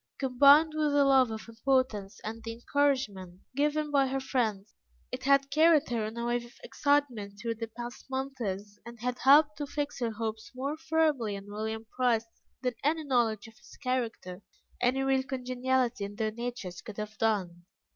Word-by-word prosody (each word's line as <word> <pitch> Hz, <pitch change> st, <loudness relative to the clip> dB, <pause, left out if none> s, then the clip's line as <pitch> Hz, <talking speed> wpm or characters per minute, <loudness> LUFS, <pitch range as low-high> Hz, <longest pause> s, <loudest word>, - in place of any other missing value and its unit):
Combined 280 Hz, +4 st, +6 dB
with 305 Hz, -2 st, +1 dB
a 285 Hz, -1 st, +5 dB
love 265 Hz, -3 st, +5 dB
of 220 Hz, 0 st, -6 dB
importance, 230 Hz, -4 st, 0 dB
and 225 Hz, +1 st, -5 dB
the 230 Hz, 0 st, -4 dB
encouragement 230 Hz, -8 st, -1 dB
given 300 Hz, +1 st, 0 dB
by 275 Hz, -2 st, +3 dB
her 270 Hz, +1 st, -1 dB
friends, 220 Hz, -7 st, -2 dB, 0.4 s
it 255 Hz, +1 st, -5 dB
had 275 Hz, 0 st, +4 dB
carried 315 Hz, -2 st, +5 dB
her 230 Hz, -3 st, -1 dB
on 220 Hz, +2 st, -6 dB
a 235 Hz, -, -2 dB
wave 240 Hz, 0 st, 0 dB
of 240 Hz, +1 st, -14 dB
excitement 255 Hz, -9 st, 0 dB
through 230 Hz, +1 st, -2 dB
the 225 Hz, 0 st, -5 dB
past 240 Hz, +3 st, -9 dB
months, 225 Hz, -7 st, -4 dB
and 235 Hz, 0 st, -11 dB
had 250 Hz, +2 st, -3 dB
helped 295 Hz, +3 st, +5 dB
to 290 Hz, -, -3 dB
fix 290 Hz, -1 st, -3 dB
her 240 Hz, -2 st, 0 dB
hopes 220 Hz, 0 st, -4 dB
more 275 Hz, +4 st, -2 dB
firmly 315 Hz, -9 st, 0 dB
on 195 Hz, -, -10 dB
William 220 Hz, +2 st, -4 dB
Price 240 Hz, -3 st, +2 dB, 0.4 s
than 250 Hz, -1 st, 0 dB
any 315 Hz, +3 st, +1 dB
knowledge 235 Hz, -6 st, +1 dB
of 225 Hz, +1 st, -17 dB
his -, -, -16 dB
character, 235 Hz, -8 st, -3 dB, 0.4 s
any 255 Hz, +2 st, +2 dB
real 270 Hz, 0 st, +2 dB
congeniality 255 Hz, -2 st, -1 dB
in 200 Hz, +1 st, -6 dB
their 220 Hz, 0 st, -1 dB
natures 230 Hz, -6 st, -6 dB
could 215 Hz, -, -10 dB
have 215 Hz, 0 st, -5 dB
done. 185 Hz, -6 st, 0 dB
245 Hz, 175 wpm, -29 LUFS, 220-275 Hz, 0.4 s, Combined